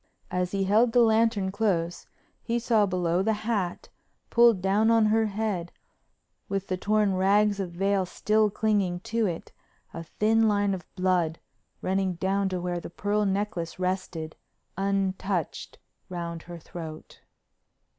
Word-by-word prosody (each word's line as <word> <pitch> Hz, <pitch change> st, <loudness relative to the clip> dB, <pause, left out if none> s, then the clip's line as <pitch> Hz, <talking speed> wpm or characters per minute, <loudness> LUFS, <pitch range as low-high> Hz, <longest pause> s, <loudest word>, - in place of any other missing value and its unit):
As 180 Hz, -1 st, 0 dB
he 195 Hz, +1 st, -1 dB
held 220 Hz, +4 st, +3 dB
the 245 Hz, -, +6 dB
lantern 220 Hz, -3 st, +2 dB
close 185 Hz, -5 st, -1 dB, 0.3 s
he 235 Hz, 0 st, -1 dB
saw 225 Hz, -3 st, +2 dB
below 180 Hz, -1 st, 0 dB
the 220 Hz, +3 st, +1 dB
hat, 200 Hz, -7 st, -2 dB, 0.4 s
pulled 235 Hz, -4 st, +5 dB
down 200 Hz, +4 st, +2 dB
on 225 Hz, -1 st, +5 dB
her 220 Hz, +1 st, +3 dB
head, 200 Hz, -4 st, -2 dB, 0.8 s
with 195 Hz, -1 st, -3 dB
the 185 Hz, -, +1 dB
torn 205 Hz, +1 st, +1 dB
rags 200 Hz, +2 st, +3 dB
of 180 Hz, -3 st, -4 dB
veil 195 Hz, +1 st, +1 dB
still 215 Hz, +3 st, +2 dB
clinging 200 Hz, -4 st, 0 dB
to 225 Hz, +1 st, 0 dB
it, 170 Hz, -2 st, -5 dB, 0.4 s
a 165 Hz, -, -5 dB
thin 220 Hz, +6 st, +2 dB
line 205 Hz, -1 st, +2 dB
of 185 Hz, -2 st, -6 dB
blood 180 Hz, -3 st, +1 dB, 0.5 s
running 190 Hz, 0 st, 0 dB
down 195 Hz, +2 st, 0 dB
to 185 Hz, -1 st, -2 dB
where 175 Hz, 0 st, -2 dB
the -, -, -8 dB
pearl 205 Hz, +3 st, 0 dB
necklace 195 Hz, -4 st, -2 dB
rested, 180 Hz, -4 st, -3 dB, 0.4 s
untouched, 195 Hz, -2 st, -2 dB, 0.3 s
round 170 Hz, -2 st, -5 dB
her 175 Hz, +1 st, -9 dB
throat. 160 Hz, -1 st, -9 dB
195 Hz, 145 wpm, -27 LUFS, 180-210 Hz, 0.8 s, the